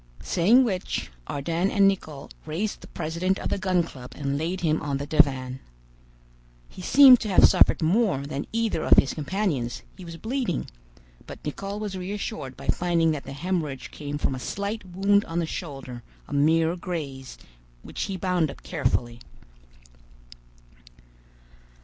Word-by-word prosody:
Saying 215 +9 +4
which, 190 -7 -2 0.2
Ardan 165 +6 -1
and 200 -1 +4
Nicholl 155 -8 -3 0.2
raised 190 +7 -3
the - - -12
president 170 +4 -2
of - - -4
the - - -1
Gun 185 -2 +2
Club 125 -6 -10
and 140 -1 -2
laid 170 +5 -2
him 160 -2 +1
on 140 -1 -2
the 140 - -4
divan. 135 -4 +2 1.1
He - - -11
seemed 260 +4 +8
to 215 - -4
have 190 - +7
suffered - - +4
more 175 - +2
than 140 0 -4
either 225 -7 0
of - - +5
his 135 - +4
companions; 155 - -2
he 185 - -11
was 170 -1 -8
bleeding, 230 - -2 0.6
but - - -8
Nicholl 195 +7 -4
was 210 -2 -4
reassured 185 - -5
by - - -10
finding 170 -2 +2
that 150 -3 -4
the 135 - -7
hemorrhage 150 -5 -3
came 145 -1 -5
from 145 - -1
a 130 - -5
slight 200 - -4
wound 195 +3 +2
on 165 - -5
the 170 - +1
shoulder, 135 -7 -7 0.3
a - - -8
mere 160 +4 +3
graze, 145 -7 -6 0.5
which - - -4
he 195 - -4
bound 180 -3 +1
up - - -11
carefully. 120 -7 -1
170 Hz, 155 wpm, -25 LUFS, 145-195 Hz, 1.1 s, seemed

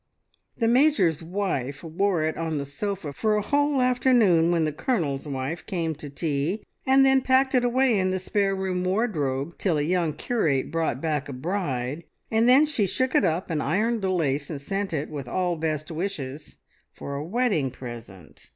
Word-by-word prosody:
The 230 - +1
Major's 235 - +3
wife 165 -7 -3
wore 170 +1 0
it 160 0 -1
on 160 -2 -2
the 140 - -3
sofa 160 +2 -4
for 215 +7 +1
a 210 - 0
whole 285 +3 +1
afternoon 235 -10 +4
when 165 -2 +2
the 155 - 0
Colonel's 155 - -1
wife 140 +4 -4
came 170 -5 -1
to 150 -1 -9
tea, 150 +6 -2 0.2
and 270 +1 +6
then 265 0 +4
packed 260 +1 +3
it 250 -2 +3
away 245 -2 +3
in 185 0 +1
the 185 - 0
spare 195 +1 0
room 190 -1 -2
wardrobe 170 - -1
till 175 -6 +1
a 145 - +1
young 170 -1 0
curate 150 - 0
brought 165 -6 -1
back 150 -3 -1
a - - -5
bride, 145 -2 -3 0.3
and 225 +2 +3
then 270 +4 +7
she 265 -10 0
shook 260 +7 0
it - - +4
up 175 0 0
and 155 -2 0
ironed 215 +10 0
the 190 - 0
lace 145 -6 0
and 150 - -4
sent 195 +7 -3
it, 150 -2 -2
with 140 -4 -6
all 180 +5 0
best 155 -1 -3
wishes, 155 -5 -5 0.3
for 140 - -7
a 140 +1 -3
wedding 195 - 0
present. 120 -8 -11
170 Hz, 190 wpm, -25 LUFS, 145-210 Hz, 0.3 s, then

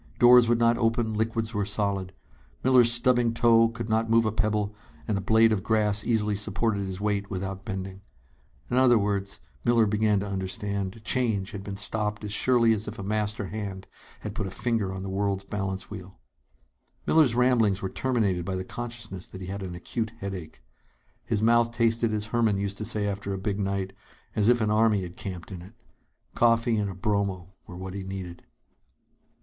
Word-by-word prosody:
Doors 120 -1 +7
would 120 - +4
not 115 0 +3
open, 115 -1 +1
liquids 110 +1 -1
were 105 -1 0
solid. 100 -2 -1 0.5
Miller's 125 -2 +6
stubbing 120 -1 +2
toe 115 -1 +5
could 115 -1 -6
not 110 0 +1
move 115 0 +4
a 110 - +1
pebble, 105 -1 0 0.3
and 110 - 0
a 100 - -1
blade 110 +3 +4
of 105 -3 +1
grass 105 -1 +1
easily 105 -3 +1
supported 105 +1 -1
his 95 -1 -5
weight 100 -1 -1
without 95 0 -4
bending. 95 -2 -5 0.7
In 125 - +1
other 130 -2 +6
words, 100 -1 -1 0.2
Miller 120 -2 +4
began 105 0 +2
to 100 - -4
understand, 100 +2 -3
change 110 -6 0
had 100 -1 -7
been 100 -1 -6
stopped 105 +1 -1
as 105 -1 -3
surely 115 -1 +4
as 105 0 -3
if 105 - -6
a 100 - -6
master 105 0 -2
hand 100 -3 -5 0.4
had 105 - -5
put 105 -2 -3
a - - -4
finger 110 -1 -1
on 95 0 -5
the - - -5
world's 100 0 -1
balance 95 -1 -4
wheel. 95 -2 -9 0.9
Miller's 150 -8 +4
ramblings 115 -6 +3
were - - 0
terminated 105 -6 0
by 95 +2 -3
the 95 0 -4
consciousness 115 -6 -6
that 95 - -10
he 95 - -7
had 100 +1 -5
an 90 -2 -5
acute 110 +5 -4
headache. 95 - -7 0.6
His 105 -1 0
mouth 120 +1 +4
tasted, 115 -1 +1
as 105 -1 -1
Herman 115 -2 +1
used 100 0 -3
to 110 - -3
say 105 -1 -1
after 100 0 -3
a - - -4
big 100 +1 -2
night, 95 -1 -2 0.4
as 105 0 +2
if 120 0 +4
an 105 -1 +1
army 105 -2 +3
had 90 0 -8
camped 90 -1 -7
in 90 -3 -7
it. 95 +6 -14 0.6
Coffee 115 -1 +3
and 105 -1 0
a 95 - -7
bromo 95 -2 -2
were 90 - -9
what 95 0 -6
he 100 - -5
needed. 95 -2 -7
105 Hz, 190 wpm, -27 LUFS, 95-115 Hz, 0.9 s, Doors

